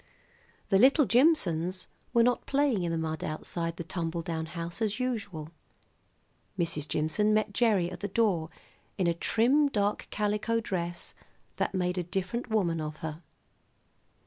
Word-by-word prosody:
The 195 - +4
little 275 +5 +6
Jimsons 185 - +2 0.3
were 235 -2 +5
not 245 0 +1
playing 275 -7 +2
in 170 -1 -1
the 165 - 0
mud 160 -1 -3
outside 165 +2 -3
the 170 - -4
tumble 165 0 -3
down 160 -1 -3
house 170 +4 -6
as 215 +1 0
usual. 205 -11 -3 1.1
Mrs. 165 -4 -1
Jimson 210 +8 +1
met 215 -1 +1
Gerry 200 -6 +2
at - - -7
the 205 - -2
door 190 -6 +1 0.5
in 185 - +1
a 170 - +3
trim 250 - +3
dark 205 -4 0
calico 210 +2 0
dress 175 -5 -3 0.4
that - - -1
made 180 0 0
a - - -1
different 190 +8 -3
woman 175 -7 +1
of 155 0 -4
her. 155 +1 -5
185 Hz, 150 wpm, -29 LUFS, 165-225 Hz, 1.1 s, little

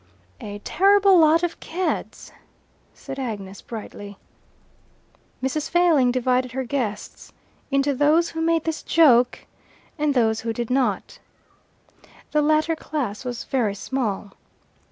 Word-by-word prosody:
"A 205 -1 -7
terrible 395 0 +4
lot 320 +1 +4
of 345 -1 -2
Cads," 360 +3 -4 0.6
said 270 - -9
Agnes 200 -6 -6
brightly. 205 -3 -9 1.3
Mrs. 290 +3 -2
Failing 330 -8 +3
divided 255 0 0
her 265 +1 -2
guests 235 -5 -4 0.4
into 275 0 +1
those 305 +5 +2
who 325 - -4
made 330 -1 +1
this 320 -1 -3
joke 250 -7 +3 0.5
and 295 -1 +1
those 225 -2 +2
who 225 0 -3
did 235 +1 -4
not. 250 -7 -1 1.1
The 300 - +2
latter 310 +2 +2
class 270 -10 -4
was 245 -2 -5
very 225 -7 -1
small. 210 -4 -3
265 Hz, 120 wpm, -23 LUFS, 230-315 Hz, 1.3 s, terrible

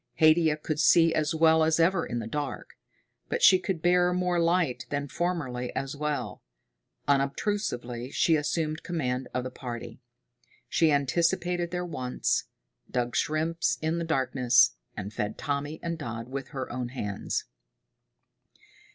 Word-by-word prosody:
Haidia 155 -1 +4
could 155 0 -3
see 165 +1 +5
as 155 +1 0
well 160 0 +5
as 160 +1 +2
ever 170 +1 +3
in 120 - -3
the 115 - -3
dark, 145 +4 -4 0.6
but - - -2
she 185 -1 +8
could 185 -3 -3
bear 180 0 +4
more 180 -1 +1
light 170 -5 +1
than 145 0 -2
formerly 135 -6 -2
as 135 +1 -3
well. 150 0 -3 0.7
Unobtrusively 135 - -1
she 165 +3 +3
assumed 155 +1 -1
command 130 -7 -2
of 125 - -2
the 130 - -5
party. 120 -2 -7 0.7
She 160 -2 +3
anticipated 170 +5 +1
their 180 0 -3
wants, 130 -7 -1 0.4
dug 120 -1 -1
shrimps 160 +2 0
in 160 +2 -1
the - - -2
darkness, 130 - +3 0.2
and 100 +3 -5
fed 105 -1 -3
Tommy 145 +2 -3
and 170 -1 -3
Dodd 115 -4 -5
with 135 -1 -5
her 130 -2 -5
own 125 0 -3
hands. 105 -6 -3
150 Hz, 140 wpm, -28 LUFS, 125-170 Hz, 0.7 s, she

